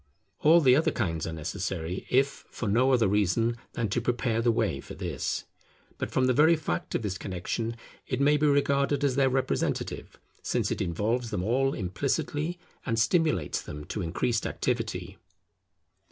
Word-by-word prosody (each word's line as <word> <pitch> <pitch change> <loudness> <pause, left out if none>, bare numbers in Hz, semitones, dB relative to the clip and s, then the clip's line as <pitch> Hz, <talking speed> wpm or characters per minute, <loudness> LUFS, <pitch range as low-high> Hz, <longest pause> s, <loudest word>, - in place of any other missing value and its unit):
All 165 +3 +6
the 130 -4 +6
other 155 - +3
kinds 80 -8 -2
are - - -3
necessary, 85 +2 -4
if 135 +2 +2
for 115 - -4
no 125 +6 +3
other 120 -5 +4
reason 105 +4 +2 0.2
than 115 -2 -1
to 120 - 0
prepare 120 -1 0
the 120 0 +3
way 110 -5 0
for - - -9
this; - - -3 0.6
but - - -2
from 130 - +1
the 130 - +3
very 155 +6 +5
fact 155 -1 -3
of - - -1
this 100 -2 -3
connexion 105 +5 -3 0.3
it 130 - -2
may 145 +2 +4
be 150 +1 +2
regarded 140 0 +2
as 135 -3 +2
their 135 -1 +4
representative; 130 0 -2 0.2
since - - -1
it - - -2
involves 110 +8 -1
them 100 -4 -2
all 135 +6 +1
implicitly 145 - -2 0.3
and 115 -4 -1
stimulates 115 - +2
them 75 0 -8
to 105 - -4
increased 105 +7 0
activity. - - -3
120 Hz, 170 wpm, -28 LUFS, 100-140 Hz, 0.6 s, All